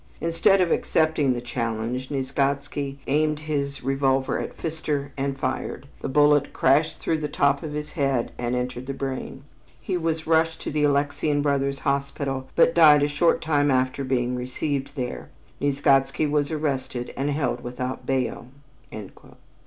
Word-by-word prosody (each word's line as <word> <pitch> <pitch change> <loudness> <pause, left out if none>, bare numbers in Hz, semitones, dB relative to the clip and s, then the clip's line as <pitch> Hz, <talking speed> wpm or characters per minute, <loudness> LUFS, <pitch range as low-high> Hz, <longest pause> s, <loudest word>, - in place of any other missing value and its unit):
Instead 165 +3 +3
of 175 - +2
accepting 155 -4 +2
the 120 - -4
challenge, 120 +1 -3
Nieczgodzki 140 0 -1
aimed 150 +2 +1
his 145 -2 -3
revolver 135 0 +1
at - - -6
Pfister 150 -3 -3
and 135 0 -2
fired. 135 - -3 0.2
The - - -3
bullet 145 +1 +4
crashed 150 +4 +3
through 160 - -1
the 150 - -2
top 140 -1 +2
of 155 -2 -6
his 150 0 -5
head 135 -6 0
and 120 0 -1
entered 125 0 -3
the 135 - -3
brain. 135 0 -5 0.4
He 185 - -2
was 160 -1 -2
rushed 160 0 +2
to - - -4
the 150 0 +2
Alexian 145 +1 +1
Brothers' 140 -1 +1
Hospital, 140 -1 -1
but 165 0 +5
died 150 -4 +7
a - - +3
short 150 +3 +2
time 145 -2 +2
after 130 +1 +1
being 125 -2 0
received 135 +3 -3
there. 125 -3 -4 0.3
Nieczgodzki 140 0 +2
was 145 -1 +1
arrested 140 -5 -3
and 140 +2 -1
held 140 -4 -1
without 125 +1 -5
bail." 130 -2 -1
140 Hz, 155 wpm, -24 LUFS, 130-150 Hz, 0.4 s, died